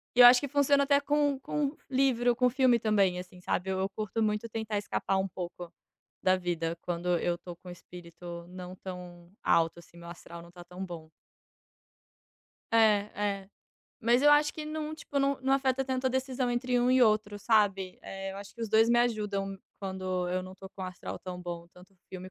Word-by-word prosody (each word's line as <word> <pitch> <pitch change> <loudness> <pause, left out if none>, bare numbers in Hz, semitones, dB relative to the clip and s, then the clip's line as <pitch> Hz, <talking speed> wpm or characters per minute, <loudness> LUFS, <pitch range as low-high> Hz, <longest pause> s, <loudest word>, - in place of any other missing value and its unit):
eu 245 0 +10
acho 245 0 +8
que 285 - -2
funciona 285 0 +3
até 280 0 +4
com 285 -1 +1
com 290 +1 -2
livro, 250 -3 +2
com 250 0 +3
filme 255 -2 +4
também, 200 -5 +2
assim, 180 0 -11
sabe, 185 +1 -1
eu 190 +1 -1
curto 215 +2 -3
muito 210 +1 0
tentar 220 -1 -3
escapar 195 -1 -1
um 190 0 0
pouco 175 -1 -7 0.5
da 185 0 +4
vida 170 -2 -2
quando 175 0 -1
eu 175 +1 -1
tô 175 - -9
com 180 - -14
o - - -6
espírito 170 -1 -10
não 180 0 -8
tão 180 -2 -9
alto, 165 +1 +2
assim, 170 - -20
meu 170 0 -11
astral 170 0 -10
não 170 - -14
tá 175 -1 -12
tão 180 +2 -7
bom. 170 -3 -8 1.6
É, 230 - +4 0.7
é, 190 - -23 0.5
mas 240 +2 +3
eu 295 - +7
acho 295 0 +5
que 310 - -6
não 310 0 -4
tipo, 290 -2 -4
não, 275 0 +1
não 265 +1 +1
afeta 270 -1 +2
tanto 260 0 -1
a - - +4
decisão 260 -1 -1
entre 245 +1 0
um 245 +1 +3
e 255 0 +5
outro, 215 -2 +2
sabe, 200 -4 +2
eh, 195 0 -6
eu - - -8
acho 200 0 -10
que 235 - -12
os 225 - -2
dois 220 +2 +5
me 240 - +4
ajudam 205 -4 -1 0.2
quando 185 -2 -3
eu 185 +1 -1
não 185 0 -9
tô 190 0 -11
com 190 - -9
o - - -2
astral 185 -1 -6
tão 180 -1 -7
bom, 170 -1 -6
tanto 180 +2 -17
o - - -30
filme 185 0 -8
200 Hz, 205 wpm, -30 LUFS, 180-250 Hz, 1.6 s, eu